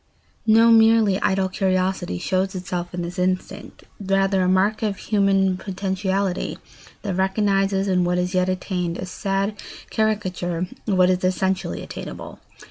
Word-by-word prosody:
No 225 Hz, +1 st, +6 dB
merely 220 Hz, -3 st, +5 dB
idle 190 Hz, -1 st, +1 dB
curiosity 185 Hz, -, -1 dB
shows 190 Hz, -, -1 dB
itself 180 Hz, -1 st, -4 dB
in 175 Hz, -1 st, -4 dB
this 175 Hz, +2 st, -6 dB
instinct; 185 Hz, 0 st, -3 dB, 0.2 s
rather 195 Hz, -1 st, +1 dB
a 180 Hz, -, +2 dB
mark 195 Hz, +3 st, +2 dB
of 210 Hz, -3 st, -1 dB
human 195 Hz, -3 st, +2 dB
potentiality 190 Hz, 0 st, -2 dB, 0.5 s
that 200 Hz, -3 st, -2 dB
recognises 195 Hz, +1 st, +1 dB
in 180 Hz, -2 st, +2 dB
what 175 Hz, 0 st, +1 dB
is 180 Hz, +1 st, -1 dB
yet 185 Hz, 0 st, +2 dB
attained 180 Hz, -2 st, -2 dB
a -, -, -5 dB
sad 195 Hz, +2 st, -2 dB, 0.3 s
caricature 190 Hz, -5 st, -1 dB, 0.3 s
of 195 Hz, -3 st, +1 dB
what 185 Hz, 0 st, +5 dB
is 185 Hz, 0 st, -1 dB
essentially 190 Hz, +1 st, -1 dB
attainable. -, -, -8 dB
190 Hz, 140 wpm, -22 LUFS, 185-195 Hz, 0.5 s, No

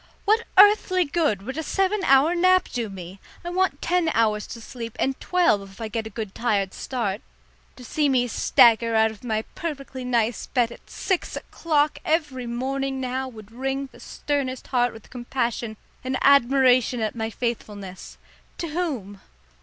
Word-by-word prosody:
What 435 Hz, +3 st, +2 dB
earthly 385 Hz, -2 st, +6 dB
good 285 Hz, -, 0 dB
would 265 Hz, +8 st, -5 dB
a -, -, 0 dB
seven 390 Hz, +4 st, 0 dB
hour 275 Hz, +5 st, +5 dB
nap 370 Hz, +1 st, +4 dB
do 235 Hz, -4 st, -2 dB
me? 190 Hz, 0 st, -9 dB, 0.3 s
I 350 Hz, -, -3 dB
want 375 Hz, +1 st, 0 dB
ten 355 Hz, -2 st, +2 dB
hours 215 Hz, -2 st, +1 dB
to 235 Hz, -, -8 dB
sleep 230 Hz, -1 st, -8 dB
and 265 Hz, 0 st, 0 dB
twelve 355 Hz, -, +2 dB
if 195 Hz, -, -17 dB
I 225 Hz, -1 st, -4 dB
get 220 Hz, +1 st, -3 dB
a -, -, -8 dB
good 215 Hz, -2 st, -6 dB
tired 200 Hz, -5 st, 0 dB
start. 225 Hz, -6 st, -3 dB, 0.5 s
To 250 Hz, -, -12 dB
see 295 Hz, +3 st, +1 dB
me 250 Hz, -2 st, +2 dB
stagger 230 Hz, -1 st, +4 dB
out 220 Hz, 0 st, +4 dB
of 220 Hz, -, -14 dB
my 220 Hz, -2 st, -1 dB
perfectly 275 Hz, -5 st, -5 dB
nice 235 Hz, -2 st, 0 dB
bed 240 Hz, -3 st, +1 dB
at -, -, -14 dB
six 375 Hz, -3 st, -2 dB
o'clock 300 Hz, -2 st, 0 dB
every 295 Hz, -6 st, -1 dB
morning 265 Hz, +3 st, -2 dB
now 260 Hz, +1 st, -2 dB
would 220 Hz, -4 st, -12 dB
wring 270 Hz, +3 st, -3 dB
the -, -, -16 dB
sternest 275 Hz, -3 st, -3 dB
heart 245 Hz, -1 st, +2 dB
with 225 Hz, -1 st, -14 dB
compassion 240 Hz, -3 st, -3 dB, 0.3 s
and 260 Hz, +1 st, -1 dB
admiration 260 Hz, -2 st, +4 dB
at 215 Hz, -1 st, -1 dB
my 225 Hz, -1 st, -3 dB
faithfulness 205 Hz, -5 st, -5 dB, 0.4 s
to 335 Hz, -, -4 dB
whom? 270 Hz, -, -3 dB
255 Hz, 170 wpm, -24 LUFS, 225-290 Hz, 0.5 s, earthly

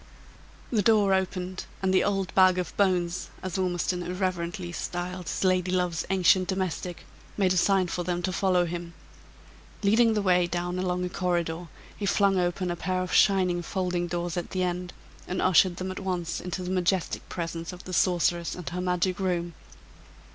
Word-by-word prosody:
The 220 Hz, -4 st, +2 dB
door 205 Hz, -2 st, +4 dB
opened, 185 Hz, -1 st, -2 dB, 0.2 s
and 190 Hz, 0 st, +2 dB
the 185 Hz, -, +4 dB
"old 195 Hz, -2 st, -1 dB
bag 185 Hz, -1 st, +5 dB
of 180 Hz, -2 st, -3 dB
bones," 180 Hz, -3 st, +1 dB
as 185 Hz, 0 st, -3 dB
Ormiston 180 Hz, -1 st, 0 dB
irreverently 180 Hz, -1 st, -3 dB
styled 175 Hz, +1 st, -4 dB
his -, -, -2 dB
lady 185 Hz, -1 st, +2 dB
love's 180 Hz, -3 st, 0 dB
ancient 185 Hz, -1 st, +4 dB
domestic, 185 Hz, -2 st, -3 dB, 0.3 s
made 190 Hz, -2 st, +3 dB
a -, -, 0 dB
sign 190 Hz, +1 st, +3 dB
for 175 Hz, 0 st, -3 dB
them 175 Hz, 0 st, -2 dB
to 185 Hz, 0 st, -1 dB
follow 180 Hz, -1 st, +2 dB
him. 170 Hz, 0 st, -5 dB, 0.9 s
Leading 225 Hz, +2 st, +4 dB
the 210 Hz, -, 0 dB
way 180 Hz, -2 st, +3 dB
down 175 Hz, +1 st, -2 dB
along 180 Hz, -1 st, -1 dB
a -, -, -3 dB
corridor, 175 Hz, -2 st, -1 dB, 0.3 s
he 200 Hz, -, -3 dB
flung 195 Hz, -1 st, +3 dB
open 175 Hz, 0 st, 0 dB
a -, -, -2 dB
pair 185 Hz, +2 st, -1 dB
of 185 Hz, -, -5 dB
shining 185 Hz, -3 st, +4 dB
folding 180 Hz, -1 st, -2 dB
doors 175 Hz, 0 st, -3 dB
at 175 Hz, -, -3 dB
the 185 Hz, -1 st, -1 dB
end, 180 Hz, 0 st, -2 dB, 0.4 s
and 185 Hz, -, -2 dB
ushered 185 Hz, 0 st, +4 dB
them 185 Hz, +1 st, -4 dB
at 185 Hz, -, -6 dB
once 180 Hz, -4 st, -3 dB
into 180 Hz, +1 st, -4 dB
the 180 Hz, -, -4 dB
majestic 185 Hz, -1 st, 0 dB
presence 165 Hz, -1 st, -4 dB
of 180 Hz, 0 st, -10 dB
the 185 Hz, -, -8 dB
sorceress 175 Hz, -1 st, +1 dB
and 180 Hz, -6 st, -6 dB
her 180 Hz, +3 st, -4 dB
magic 180 Hz, 0 st, 0 dB
room. 175 Hz, -3 st, -1 dB
180 Hz, 180 wpm, -27 LUFS, 175-185 Hz, 0.9 s, bag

